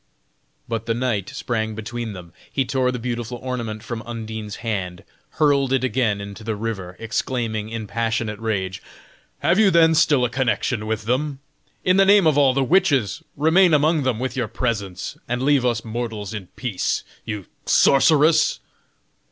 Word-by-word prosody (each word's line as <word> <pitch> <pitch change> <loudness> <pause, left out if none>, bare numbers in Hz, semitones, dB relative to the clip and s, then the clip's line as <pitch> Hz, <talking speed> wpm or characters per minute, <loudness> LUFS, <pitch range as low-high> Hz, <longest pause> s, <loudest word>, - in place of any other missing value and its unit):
But 115 -1 -3
the 115 - +1
knight 115 -6 -1
sprang 110 -2 -3
between 110 0 -5
them. 90 -3 -11 0.2
He 135 - 0
tore 130 -1 +1
the 125 - -3
beautiful 120 0 -4
ornament 120 -4 -4
from 120 -1 -5
Undine's 110 -2 -6
hand, 90 -6 -3 0.3
hurled 140 -3 +2
it 135 -2 +2
again 120 -4 +1
into 100 +2 -8
the 110 0 -2
river, 100 -4 -5
exclaiming 115 -1 -2
in 115 -1 -5
passionate 115 -1 -2
rage: 95 -4 -2 0.6
"Have 170 +7 +3
you 215 -3 +6
then 165 -2 +5
still 150 -5 +4
a - - -1
connection 125 -3 0
with 110 0 -2
them? 135 +4 0 0.5
In 185 +1 +3
the 195 - +6
name 200 -2 +6
of 155 -3 +4
all 135 -3 +4
the 135 - +2
witches, 140 - +2 0.2
remain 160 +3 +5
among 155 +2 +3
them 130 -4 0
with 130 +1 -3
your 125 -3 -1
presents, 100 -6 -3
and 120 +2 -2
leave 140 -2 +3
us 120 -2 0
mortals 110 -2 -4
in 100 -4 -6
peace, 115 -8 -2 0.2
you 105 -4 -5 0.2
sorceress!" 155 +3 +4
120 Hz, 165 wpm, -22 LUFS, 110-135 Hz, 0.6 s, you